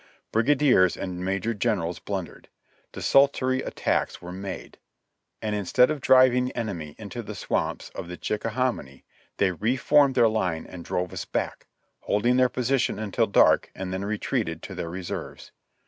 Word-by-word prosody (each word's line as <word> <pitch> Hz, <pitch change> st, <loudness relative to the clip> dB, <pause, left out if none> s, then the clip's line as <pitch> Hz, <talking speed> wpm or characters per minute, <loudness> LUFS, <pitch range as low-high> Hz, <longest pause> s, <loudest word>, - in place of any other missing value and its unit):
Brigadiers 125 Hz, -6 st, +3 dB
and 90 Hz, -1 st, -5 dB
major 95 Hz, +5 st, -1 dB
generals 100 Hz, -6 st, -1 dB
blundered; 95 Hz, -5 st, -6 dB, 0.4 s
desultory 130 Hz, -1 st, +3 dB
attacks -, -, -1 dB
were 90 Hz, 0 st, -9 dB
made; 95 Hz, +1 st, -7 dB, 0.6 s
and 105 Hz, -1 st, -1 dB
instead 105 Hz, +7 st, +3 dB
of 150 Hz, -3 st, -3 dB
driving 130 Hz, -1 st, +5 dB
the 125 Hz, -, -5 dB
enemy 85 Hz, -10 st, -4 dB
into -, -, -6 dB
the -, -, -8 dB
swamps -, -, -2 dB
of -, -, -6 dB
the 90 Hz, 0 st, -7 dB
Chicka 105 Hz, +2 st, -2 dB
hominy, 120 Hz, -, -2 dB, 0.3 s
they 95 Hz, -2 st, +2 dB
reformed 130 Hz, -, +3 dB
their 115 Hz, -, +5 dB
line 90 Hz, -7 st, -1 dB
and 90 Hz, -2 st, -9 dB
drove 90 Hz, +1 st, -2 dB
us -, -, -5 dB
back, -, -, -3 dB, 0.3 s
holding 120 Hz, +5 st, +1 dB
their 130 Hz, -1 st, +4 dB
position 125 Hz, +1 st, 0 dB
until 110 Hz, -2 st, 0 dB
dark -, -, +4 dB
and 95 Hz, -1 st, -5 dB
then 95 Hz, +1 st, -3 dB
retreated 105 Hz, +1 st, -2 dB
to -, -, -7 dB
their 85 Hz, -, -5 dB
reserves. 90 Hz, +1 st, -6 dB
105 Hz, 155 wpm, -26 LUFS, 90-125 Hz, 0.6 s, driving